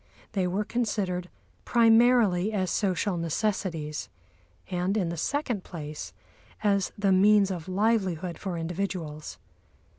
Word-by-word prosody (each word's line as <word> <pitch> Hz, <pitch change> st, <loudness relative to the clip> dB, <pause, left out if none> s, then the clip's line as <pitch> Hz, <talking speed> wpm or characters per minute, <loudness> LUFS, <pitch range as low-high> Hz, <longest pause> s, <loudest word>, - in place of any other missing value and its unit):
They 190 Hz, -4 st, 0 dB
were 190 Hz, +4 st, 0 dB
considered 195 Hz, -6 st, -2 dB, 0.3 s
primarily 225 Hz, -4 st, +4 dB
as 190 Hz, -4 st, -1 dB
social 190 Hz, -1 st, 0 dB
necessities, 165 Hz, -3 st, -2 dB, 0.6 s
and 180 Hz, +3 st, 0 dB
in 180 Hz, -5 st, 0 dB
the 170 Hz, -, -3 dB
second 240 Hz, -, -1 dB
place 150 Hz, -, -7 dB, 0.5 s
as 200 Hz, -2 st, +2 dB
the 200 Hz, -1 st, +2 dB
means 200 Hz, +1 st, +5 dB
of 175 Hz, -3 st, -5 dB
livelihood 185 Hz, -4 st, 0 dB
for 185 Hz, -4 st, -4 dB
individuals. 165 Hz, -3 st, -4 dB
190 Hz, 115 wpm, -27 LUFS, 175-210 Hz, 0.6 s, means